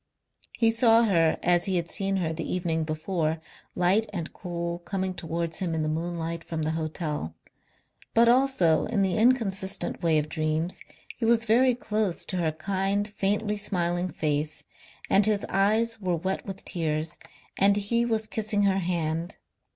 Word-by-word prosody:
He 230 -1 +3
saw 230 0 +5
her 165 -7 +3
as 175 0 +3
he 190 - 0
had 170 -1 0
seen 195 +3 0
her 170 -4 -1
the 160 0 -4
evening 170 -3 0
before, 155 0 -2 0.4
light 190 +5 +2
and 170 -5 -5
cool, 170 -1 -4
coming 190 +1 -3
towards 165 -1 -3
him 175 -3 -2
in 160 - -1
the 155 - -1
moonlight 165 +1 -3
from 160 -1 -4
the 155 - 0
hotel. 155 - -3 0.8
But 230 +1 +6
also 240 -10 +3
in 215 -3 +1
the 190 -2 +1
inconsistent 220 -5 +1
way 165 -3 +3
of 150 0 0
dreams 155 +2 -2 0.3
he - - -7
was 230 0 +3
very 245 +3 +4
close 210 -6 -2
to 185 - -3
her 165 -3 +1
kind, 195 +5 -1
faintly 210 +1 -1
smiling 180 -3 -1
face, 150 -2 -2 0.4
and 200 - +4
his 210 -2 +1
eyes 220 +4 +2
were 180 -2 0
wet 190 +5 -3
with 195 0 -7
tears 155 -2 -2 0.4
and 200 +1 +4
he 235 +4 +1
was 220 -2 0
kissing 215 -1 0
her 195 -1 +3
hand. 170 0 -2
185 Hz, 165 wpm, -27 LUFS, 165-210 Hz, 0.8 s, But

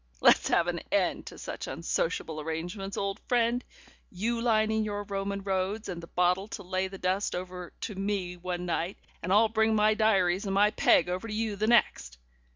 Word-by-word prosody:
Let's - - +5
have - - +3
an - - -2
end - - +1
to - - -9
such - - -6
unsociable 165 -1 -2
arrangements, 175 +5 -4
old 200 0 -2
friend; 240 0 +2 0.5
you 230 +5 -2
lining 220 -2 +2
your 205 -1 -3
Roman 200 0 -3
roads 195 +2 -1
and 175 -3 -5
the 170 - -10
bottle 180 +3 +1
to 210 -2 -7
lay 185 +1 -1
the 195 +1 -9
dust 185 +2 0
over 180 0 -6
to 210 - -4
me 195 -2 -2
one 180 0 -4
night, 175 +1 -2 0.2
and 180 - -3
I'll 215 +3 +6
bring 220 0 +2
my 215 0 +4
diaries 195 -3 +2
and 195 -1 -1
my 205 +1 +5
peg 175 - +4
over 185 +5 -3
to 210 - -5
you 220 -1 -1
the 215 +2 -1
next. 140 - +2
195 Hz, 190 wpm, -29 LUFS, 180-215 Hz, 0.5 s, I'll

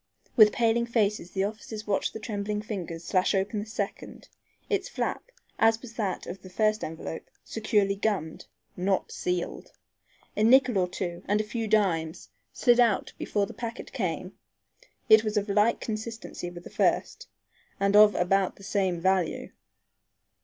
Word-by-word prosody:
With 215 -3 +8
paling 235 0 +1
faces 210 -6 0
the 190 +1 -1
officers 215 +1 -5
watched 200 -2 0
the - - -6
trembling 210 -1 -3
fingers 175 -6 -5
slash 185 +3 +1
open 195 +2 0
the 210 - -5
second, 205 -2 -5 0.4
its 400 -2 -1
flap, - - -3 0.3
as 225 0 +4
was 235 -1 -11
that 205 -6 -2
of 185 +1 -7
the 185 - -11
first 215 +3 +1
envelope, 160 0 -6 0.2
securely 210 -3 +1
gummed, 200 -6 -2 0.3
not 190 +1 0
sealed. 180 -1 -3 0.6
A 210 - +1
nickel 245 -2 +5
or 180 - +2
two 175 -1 -5
and 205 +1 +2
a - - +1
few 225 +1 -3
dimes 175 -7 0 0.2
slid 245 -2 +3
out 230 -5 +2
before 205 -1 0
the - - -10
packet 235 0 -7
came. 185 - -3 0.7
It 220 0 +7
was 215 -1 -1
of 205 0 0
like 210 +3 +3
consistency 220 -4 -5
with 175 0 -10
the - - -11
first - - 0 0.5
and 200 +1 +2
of 210 0 +8
about 190 +2 +1
the 195 - -16
same 190 -3 0
value. 185 -1 0
205 Hz, 160 wpm, -27 LUFS, 185-220 Hz, 0.7 s, With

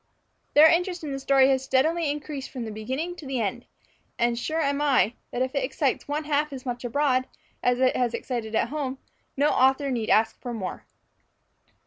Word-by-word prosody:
Their 300 +2 +9
interest 350 +1 +1
in 295 - -4
the 270 - -3
story 270 -1 +4
has 265 -1 +2
steadily 305 +5 +1
increased 290 -1 -5
from 250 -3 -6
the 220 - -5
beginning 260 +11 -4
to 300 - -9
the 265 -2 -2
end; 230 +3 -3 0.5
and 235 0 +2
sure 310 +7 -2
am 285 -2 0
I, 265 -6 +3 0.2
that 250 - -1
if 260 +1 -3
it 275 -2 0
excites 270 0 -1
one 295 +2 -2
half 300 0 0
as 265 -2 -8
much 245 -1 -4
abroad, 255 +1 +1 0.3
as 245 0 +2
it 255 0 +3
has 245 -2 0
excited 230 -4 -4
at 225 - +1
home, 275 -2 -3 0.4
no 290 +2 +3
author 265 +2 +3
need 230 -4 -2
ask 220 +1 +2
for 245 -2 -5
more. 190 -5 -6
265 Hz, 195 wpm, -26 LUFS, 245-295 Hz, 0.5 s, Their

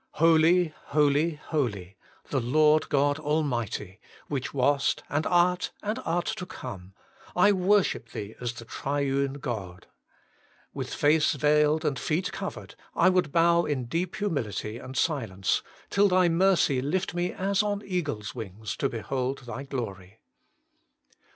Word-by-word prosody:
Holy, 165 +1 +4
holy, 150 +2 +2
holy, 110 - -3 0.4
the - - +1
Lord 150 +5 +3
God 145 +1 +2
Almighty! 125 - -2 0.3
which 135 -3 -3
wast, 140 +1 +1
and 145 +2 0
art, 180 0 +2
and 215 +4 -2
art 170 +2 0
to 220 -5 -4
come! 95 - -8 0.4
I 190 +3 +5
worship 190 - +2
Thee 105 +1 -6
as 120 -1 -2
the 115 -1 -10
Triune 140 +1 -1
God. 105 -11 -6 0.9
With - - -5
face 150 +1 +3
veiled 150 +2 +2
and 140 -4 0
feet 160 +7 -1
covered, - - -6 0.2
I - - +5
would 180 -5 +1
bow 170 +1 +4
in 135 -4 -2
deep 170 +8 -2
humility 115 - -3
and 130 +1 -8
silence, 115 - 0 0.3
till 200 +1 +4
Thy 185 -1 +4
mercy 170 -6 +3
lift 180 +8 -1
me 175 +1 -1
as 195 +1 0
on 205 -1 -2
eagles' 145 - -3
wings 110 -2 -6
to 135 - 0
behold 130 +4 -3
Thy 125 +2 -6
glory. 110 -8 -6
145 Hz, 140 wpm, -27 LUFS, 120-170 Hz, 0.9 s, I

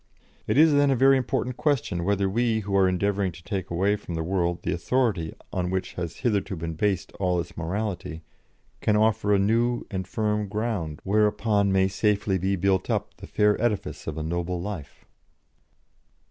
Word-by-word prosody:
It - - +1
is, 155 0 +6
then, 145 0 +4
a 135 - +3
very 135 +2 +5
important 125 -1 -1
question 130 - 0
whether 100 +1 +1
we, 110 +2 +1
who 100 -1 -3
are 95 -1 +5
endeavouring 100 +1 0
to 85 +1 -13
take 95 -1 -4
away 95 +4 +1
from 95 -5 -7
the 80 - -2
world 85 -1 -1
the 90 - -1
authority 95 -3 0 0.2
on 90 -1 -1
which 95 0 -2
has 85 -2 -5
hitherto 100 -3 +1
been 80 0 -4
based 95 +2 -1
all 90 -2 +1
its 85 - -6
morality, 85 -2 -4 0.6
can 105 - +2
offer 105 -1 +2
a 100 - +5
new 115 +5 +1
and 95 -2 -3
firm 105 0 -1
ground 100 -7 -3
whereupon 105 0 +2
may 95 0 +3
safely 100 -1 +1
be 95 +2 0
built 95 0 +1
up - - -1
the - - -10
fair 105 0 +2
edifice 115 -4 -2
of 80 -1 -4
a 80 - -3
noble 85 +2 -2
life." 90 -6 -7
100 Hz, 180 wpm, -26 LUFS, 90-110 Hz, 0.6 s, is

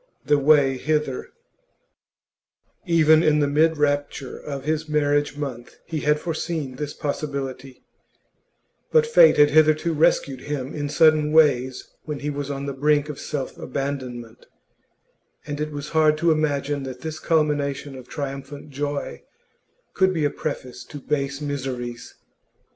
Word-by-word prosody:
THE 145 - +3
WAY 140 -2 +4
HITHER 150 -3 -1 1.6
Even 160 -2 +5
in 150 -2 +3 0.2
mid 160 +1 +3
rapture 145 -2 -1
of 140 -2 -7
his 155 +1 -2
marriage 145 -1 +1
month 130 -5 -6
he 160 -2 -3
had 150 +1 +2
foreseen 155 -5 -4
this 150 0 -4
possibility; 140 -3 -5 1.1
but 470 -1 +5
fate 480 +1 +6
had 145 0 +6
hitherto 155 +2 +4
rescued 140 -4 +2
him 145 -2 -4
in 145 -1 -3
sudden 155 -1 +4
ways 130 -5 +3 0.2
when 150 -2 -5
he 150 +1 -2
was 145 -1 -4
on 140 0 -4
the 140 - -3
brink 145 +2 +1
of 150 - -6
self 140 -3 -4
abandonment, 130 -4 -5 1.0
and 145 0 -5
it 155 0 -3
was 145 0 -6
hard 155 -1 +3
to 170 +1 +2
imagine 145 -2 0
that 130 -1 -7
this 160 -1 -5
culmination 145 -3 0
of 130 -1 -11
triumphant 140 +1 -6
joy 145 +1 -4 0.7
could 190 -1 +2
be 155 -3 +1
a 145 - +1
preface 130 -4 -5
to 150 - -9
base 140 0 -2
miseries. 125 -4 -5
145 Hz, 140 wpm, -23 LUFS, 140-155 Hz, 1.6 s, fate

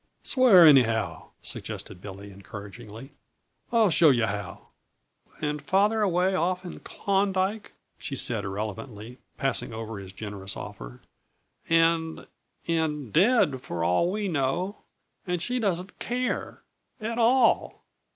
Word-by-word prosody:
_" - - -15
"Swear 235 -10 +7
anyhow," 120 -7 +4
suggested 90 - -6
Billy 100 0 -9
encouragingly. 105 +5 -10 0.6
"I'll 225 -5 +4
show 160 0 +6
yuh 120 -5 +3
how." 100 -2 -6 0.7
"And 150 -1 -2
father 205 +8 +2
away 185 -1 +2
off 185 +1 0
in 175 - -7
Klondyke," 195 +1 -1 0.3
she - - -5
said - - -1
irrelevantly, 110 +4 -6 0.2
passing 130 -5 -1
over 110 -2 -6
his 95 -1 -9
generous 100 -1 -5
offer, - - -9 0.7
"and 165 0 +2 0.4
and 150 -7 -1
dead, 190 - +3
for 85 -7 -4
all 90 - +2
we 210 0 -2
know! 175 +6 -1 0.5
And 180 -1 -1
she 250 +9 -1
doesn't 190 -3 -2
care 250 +1 -3 0.4
at 230 +2 -3
_all! 235 +1 +3
160 Hz, 120 wpm, -26 LUFS, -, 0.7 s, Swear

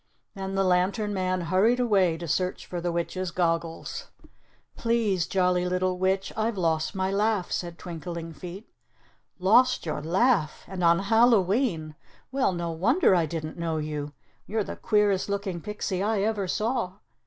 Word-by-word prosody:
Then 195 -1 -5
the 195 - +2
lantern 190 +4 +1
man 185 -1 0
hurried 190 +8 +2
away 195 -9 +3
to 170 0 -6
search 180 +4 -1
for 175 -1 -5
the 175 0 -1
witch's 170 +2 -2
goggles. 165 -1 -2 0.7
"Please, 225 -7 +1
Jolly 180 -1 +1
Little 185 0 0
Witch, 190 +1 0
I've 220 -1 -1
lost 165 0 0
my 190 0 0
laugh," 205 -1 0
said 170 -1 -3
Twinkling 170 -1 -6
Feet. 180 +6 -9 0.7
"Lost 235 +7 +4
your 155 -2 -3
laugh! 180 - +1
and 185 -2 -4
on 170 0 +5
Hallowe'en! 200 - +2 0.4
Well, 265 -5 +2
no 170 -1 -3
wonder 205 - +3
I 170 -3 +3
didn't 155 +1 -5
know 165 -1 -1
you. 150 -1 -4 0.3
You're 215 +1 0
the - - -6
queerest 205 -3 +1
looking 200 -4 -2
pixie 210 -2 -3
I 210 0 +1
ever 205 -2 0
saw. 220 -1 -1
185 Hz, 155 wpm, -27 LUFS, 170-210 Hz, 0.7 s, on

